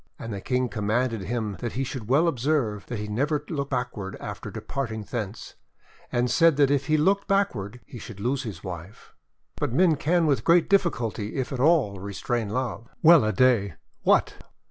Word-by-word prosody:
And 115 -1 -6
the 100 - -5
King 125 +2 0
commanded 115 +1 -1
him 105 0 -3
that 120 -2 -4
he 135 - -1
should 125 -4 -6
well 150 +6 +4
observe 125 -8 0
that 120 - -4
he 105 0 -4
never 145 +7 -1
look 140 -4 -3
backward 125 -7 -3
after - - -6
departing 115 -6 -4
thence, 105 0 -5 0.6
and 120 0 +1
said 165 +4 +4
that 140 -2 +4
if 140 0 +1
he 155 0 +3
looked 195 +6 +2
backward 125 - 0
he 125 - -10
should 110 -2 -10
lose 125 +5 0
his 105 -9 -7
wife. 90 +2 -9 0.4
But - - -2
men 165 +1 +4
can 165 +3 +2
with 135 -7 +1
great 170 0 +4
difficulty, 120 - 0
if 130 0 -2
at 130 - -4
all, 135 - +3
restrain 105 +3 -3
love! 115 -1 -3
Well 165 -4 +8
a 110 - +1
day! 115 -8 +3 0.3
What! - - +2
125 Hz, 185 wpm, -26 LUFS, 105-145 Hz, 0.6 s, Well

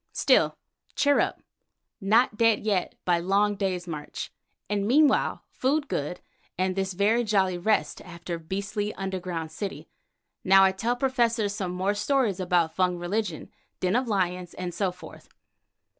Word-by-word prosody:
Still, - - +3 0.4
cheer 285 -1 +3
up, - - -1 0.6
not 215 +3 +3
dead 230 0 +3
yet 200 -4 0
by 175 -1 +3
long 200 +4 +2
day's 185 -3 -2
march, 150 -3 -6 0.4
and 205 -1 -1
meanwhile 290 +4 +3
food 280 +3 0
good 150 - -3 0.4
and 185 0 0
this 190 -1 -1
very 210 +6 +2
jolly 195 -4 +2
rest 215 +4 0
after 170 -1 -7
beastly 200 +5 -3
underground 180 -4 -4
city. 195 +4 -6 0.6
Now 195 0 +6
I 190 - +5
tell 225 +6 -1
Professor 240 -4 +1
some 195 -3 -3
more 190 +3 0
stories 210 -2 +1
about 175 -3 +1
Fung 180 -1 +1
religion, 175 -1 -3 0.3
den 185 +3 +1
of 250 +1 +1
lions, 180 -4 -1
and 180 -1 -5
so 195 -1 0
forth." 180 - -13
195 Hz, 145 wpm, -26 LUFS, 180-215 Hz, 0.6 s, Now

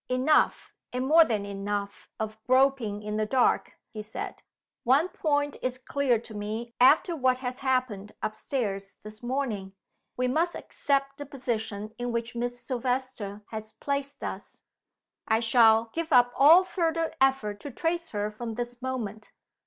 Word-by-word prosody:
"Enough, 255 +5 +2 0.2
and 250 +1 -2
more 320 +4 +7
than 215 -8 -1
enough, 200 0 -4
of 220 0 -5
groping 255 -5 +2
in 210 0 -3
the 215 - +1
dark," 250 +2 +2 0.2
he 215 - -6
said. 215 +1 -6 0.4
"One 280 +9 +3
point 290 -4 0
is 255 0 -2
clear 260 -1 +1
to 225 0 -11
me 215 +3 -5
after 305 +7 +5
what 255 -3 +2
has 250 +1 -3
happened 255 -7 -1
up 215 - -1
stairs 200 -6 -3
this 215 0 -11
morning. 240 -7 -3 0.4
We 250 0 +1
must 325 +7 +1
accept 275 0 -1
the 290 - -6
position 220 -6 -4
in 245 0 -2
which 235 0 -2
Miss 245 +1 -3
Silvester 245 -4 -3
has 220 0 -6
placed 280 0 -3
us. - - -7 0.6
I 220 0 +3
shall 225 -1 +4
give 330 0 -3
up 245 -2 +5
all 320 +7 +8
further 330 -3 -1
effort 265 -7 +2
to 285 - -7
trace 335 +4 -2
her 210 0 -2
from 225 +1 -6
this 240 +1 -5
moment." 225 -5 -4
245 Hz, 155 wpm, -28 LUFS, 215-275 Hz, 0.6 s, all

